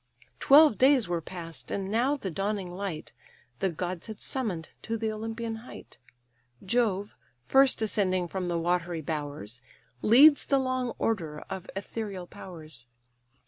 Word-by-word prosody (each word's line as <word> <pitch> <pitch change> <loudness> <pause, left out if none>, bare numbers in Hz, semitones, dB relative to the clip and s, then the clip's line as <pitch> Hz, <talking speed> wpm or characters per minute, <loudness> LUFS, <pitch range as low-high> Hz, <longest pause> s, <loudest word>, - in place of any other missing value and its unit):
Twelve 290 -3 +6
days 265 -4 +5
were 175 -1 -1
past, 165 -4 -6
and 195 0 -3
now 255 +6 +2
the 195 -9 -5
dawning 195 +1 -2
light 180 -4 -5 0.5
The 190 - +1
gods 175 +2 -4
had 220 -2 -8
summon'd 200 -12 -3
to 225 - -3
the 220 0 -1
Olympian 225 +1 -4
height: 230 +3 -12 0.7
Jove, 205 -2 0 0.3
first 270 -4 +4
ascending 185 -4 +1
from 185 +1 -3
the 175 -1 0
watery 175 0 -1
bowers, 145 -7 -5 0.4
Leads 285 +7 +7
the 275 - +3
long 255 -2 -1
order 160 -9 -2
of 190 -1 -6
ethereal 195 -2 -5
powers. 155 -10 -11
195 Hz, 140 wpm, -28 LUFS, 175-230 Hz, 0.7 s, Leads